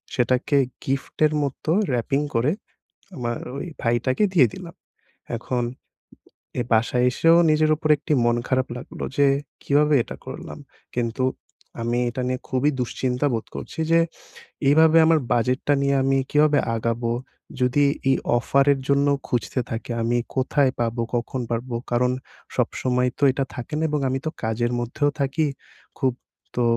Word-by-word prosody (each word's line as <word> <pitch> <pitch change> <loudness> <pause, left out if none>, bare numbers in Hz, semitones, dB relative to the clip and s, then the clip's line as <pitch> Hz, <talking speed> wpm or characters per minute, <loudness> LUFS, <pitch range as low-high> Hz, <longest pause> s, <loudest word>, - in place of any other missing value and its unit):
সেটাকে 130 +3 +2 0.3
গিফটের 140 +3 0
মতো 140 +3 -3 0.2
র‍্যাপিং 130 +4 0
করে 125 +6 +2 0.7
আমার 120 -3 -2 0.2
ওই - - -4 0.2
ভাইটাকে 120 - +1
দিয়ে 150 -9 +6
দিলাম। - - -9 0.6
এখন 125 +1 -2 1.0
এই - - 0
বাসায় 120 +2 +3
এসেও 165 +6 +4
নিজের 155 0 +3
উপর 155 - -2
একটি 150 - -3
মন 120 0 +3
খারাপ 130 -1 +1
লাগলো 125 - -7
যে 145 - +5 0.4
কীভাবে 150 +1 +3
এটা - - -9
করলাম। - - -7 0.4
কিন্তু 120 +1 -1 0.6
আমি 120 +1 0
এটা 125 +2 -4
নিয়ে 130 0 -2
খুবই 130 +3 +2
দুশ্চিন্তা 125 +2 -1
বোধ 115 - -3
করছি - - -8
যে 165 - +6 0.7
এভাবে 160 +2 +6
আমার 160 0 +4
বাজেটটা 125 +4 +2
নিয়ে 140 0 +2
আমি 135 0 +2
কীভাবে 150 0 +4 0.2
আগাবো 115 +1 -1 0.5
যদি 125 +3 +3 0.3
এই 135 - +5 0.2
অফারের 140 +3 +3
জন্য 140 0 +3 0.2
খুঁজতে 125 +1 -1
থাকি। 115 +2 -4
আমি 120 +1 +1 0.2
কোথায় 135 0 +2
পাবো? 115 0 0
কখন 120 +2 -2
পারব? 120 +2 -2 0.2
কারণ 125 +1 +2 0.5
সবসময় 125 0 +1
তো 145 - -1
এটা 135 +1 -1
থাকে 125 +4 -7
না 160 - 0
এবং 150 0 0
আমি 130 - -1
তো - - +1
কাজের 115 +2 0
মধ্যেও 140 +5 0
থাকি 140 +3 +1 0.5
খুব। 130 -2 +2 0.4
তো 120 - +1
130 Hz, 145 wpm, -23 LUFS, 120-145 Hz, 1.0 s, দিয়ে